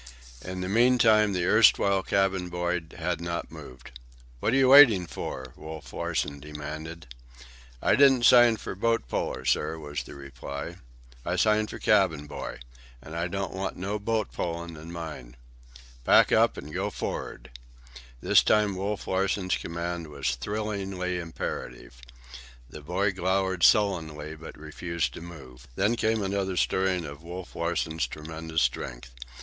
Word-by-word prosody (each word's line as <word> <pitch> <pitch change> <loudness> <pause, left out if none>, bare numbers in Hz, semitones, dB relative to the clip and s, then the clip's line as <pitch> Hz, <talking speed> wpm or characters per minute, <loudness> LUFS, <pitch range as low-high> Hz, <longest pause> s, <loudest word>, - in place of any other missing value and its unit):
In 90 0 -5
the 90 - -3
meantime 110 -1 +4
the 90 -2 -1
erstwhile 100 -1 +5
cabin 95 -2 0
boy 90 0 -1 0.2
had 85 0 -2
not 85 0 -4
moved. 65 -1 -11 0.5
"What 110 - 0
are - - +2
you 135 -1 +4
waiting 130 -10 +8
for?" 65 -5 -6
Wolf 80 0 -9
Larsen 70 -1 -2
demanded. 75 0 -8 0.7
"I - - +4
didn't 135 -4 +5
sign 120 -3 +7
for - - -6
boat 115 - 0
puller, - - -3
sir," 75 +2 +1
was 75 -2 -5
the - - -11
reply. 70 +4 -7 0.5
"I 85 +4 -1
signed 105 +3 +2
for - - -7
cabin 95 -8 +2
boy. 75 - -7 0.4
An' 80 - -11
I 85 +1 -1
don't 95 -1 -4
want 95 +1 -4
no 100 +4 -3
boat 110 0 -1
pullin' 85 -1 -4
in 80 +2 -10
mine." 75 -8 -8 0.7
"Pack - - +5
up - - +4
and 75 +2 -8
go - - -1
for'ard." 65 +2 -6 0.7
This - - +5
time 105 -2 +2
Wolf 100 +2 -3
Larsen's 95 0 0
command 85 0 -4
was 70 -4 -2
thrillingly 95 - -3
imperative. - - -6 0.7
The 75 +5 -10
boy 90 +6 0
glowered 95 0 0
sullenly, 80 -7 +2
but 80 +1 -11
refused 85 +2 -3
to - - -9
move. 70 -8 -12
Then 105 +5 +2
came 110 -2 0
another 95 -1 -2
stirring 95 -2 +1
of 70 0 -9
Wolf 85 +2 -8
Larsen's 85 -1 -1
tremendous 80 +1 -3
strength. - - -3
85 Hz, 145 wpm, -27 LUFS, 80-100 Hz, 0.7 s, waiting